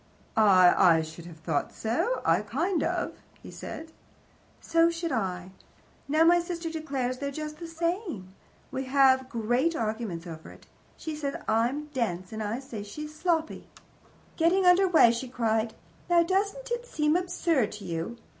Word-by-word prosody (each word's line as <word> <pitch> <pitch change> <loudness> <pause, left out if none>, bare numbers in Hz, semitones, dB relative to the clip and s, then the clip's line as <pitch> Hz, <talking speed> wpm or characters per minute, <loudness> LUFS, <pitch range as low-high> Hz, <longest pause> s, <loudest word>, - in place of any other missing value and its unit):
"I 185 -5 +6
I 160 - +2
should 160 +2 -10
have 165 -2 -11
thought 160 -2 -2
so, 245 - -1 0.2
kind 330 - 0
of," - - -1 0.3
he - - -10
said. 320 0 -8 0.7
"So 330 0 +3
should 335 0 -3
I. 185 -3 -2 0.6
Now, 310 +3 +4
my 345 +1 +6
sister 340 -1 -4
declares 270 -6 -3
they're 280 0 -2
just 305 +1 -6
the 340 - -6
same. 330 - -3 0.4
We 265 0 -3
have 260 -1 +4
great 245 +8 0
arguments 215 - -3
over 160 -2 -9
it. - - -15 0.3
She 315 -1 -5
says 285 -2 -3
I'm 240 +7 +1
dense; 185 -7 -2
I 220 +1 -2
say 240 -6 -7
she's 300 +10 -7
sloppy." 325 0 -1 0.7
Getting 355 +3 +3
under 360 +2 +6
way, 320 -10 +6
she 235 +2 -4
cried: 225 -2 -1 0.3
"Now, 345 -1 +5
doesn't 400 +8 -1
it 480 0 -2
seem 300 -6 +1
absurd 335 - +1
to 210 - -9
you? 170 +8 -4
270 Hz, 155 wpm, -28 LUFS, 220-335 Hz, 0.7 s, I